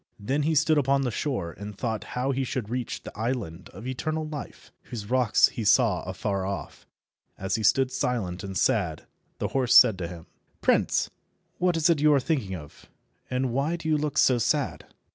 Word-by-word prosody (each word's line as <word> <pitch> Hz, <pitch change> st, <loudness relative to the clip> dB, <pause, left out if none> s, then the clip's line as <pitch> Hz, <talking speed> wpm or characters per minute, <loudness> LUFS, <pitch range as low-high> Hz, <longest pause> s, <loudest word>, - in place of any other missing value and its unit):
Then 135 Hz, +8 st, -1 dB
he 155 Hz, +2 st, +1 dB
stood 155 Hz, 0 st, +4 dB
upon 140 Hz, 0 st, +2 dB
the 125 Hz, -, -1 dB
shore, 110 Hz, -, -2 dB
and 105 Hz, -1 st, -7 dB
thought 110 Hz, -3 st, -2 dB
how 130 Hz, +2 st, +1 dB
he 135 Hz, 0 st, -1 dB
should 125 Hz, -4 st, -3 dB
reach 125 Hz, -1 st, -3 dB
the -, -, -9 dB
island 110 Hz, -7 st, -3 dB
of 100 Hz, +6 st, -11 dB
eternal 155 Hz, +5 st, -2 dB
life, 150 Hz, -2 st, -8 dB
whose 110 Hz, -2 st, -7 dB
rocks 125 Hz, -4 st, +4 dB
he 115 Hz, -, -5 dB
saw 105 Hz, -, +4 dB
afar 100 Hz, -2 st, -2 dB
off. 100 Hz, +1 st, -6 dB, 0.5 s
As 95 Hz, 0 st, -3 dB
he 110 Hz, -, 0 dB
stood 130 Hz, +5 st, +3 dB
silent 115 Hz, -8 st, -2 dB
and 95 Hz, -1 st, -4 dB
sad, -, -, +1 dB, 0.3 s
his -, -, -2 dB
horse 130 Hz, -3 st, +2 dB
said 110 Hz, -7 st, +8 dB
to 85 Hz, -, -3 dB
him— 85 Hz, -1 st, -10 dB, 0.3 s
"Prince, -, -, +2 dB, 0.5 s
what 180 Hz, -2 st, +2 dB
is 165 Hz, 0 st, +3 dB
it 165 Hz, -4 st, +3 dB
you 150 Hz, 0 st, +5 dB
are -, -, +4 dB
thinking 125 Hz, -, -1 dB
of, 75 Hz, -4 st, -12 dB, 0.4 s
and 130 Hz, 0 st, -1 dB
why 140 Hz, +6 st, 0 dB
do 165 Hz, -2 st, -6 dB
you 155 Hz, -, +3 dB
look 150 Hz, -1 st, -2 dB
so 125 Hz, -2 st, +4 dB
sad?" 110 Hz, -, -1 dB
125 Hz, 195 wpm, -26 LUFS, 100-140 Hz, 0.5 s, said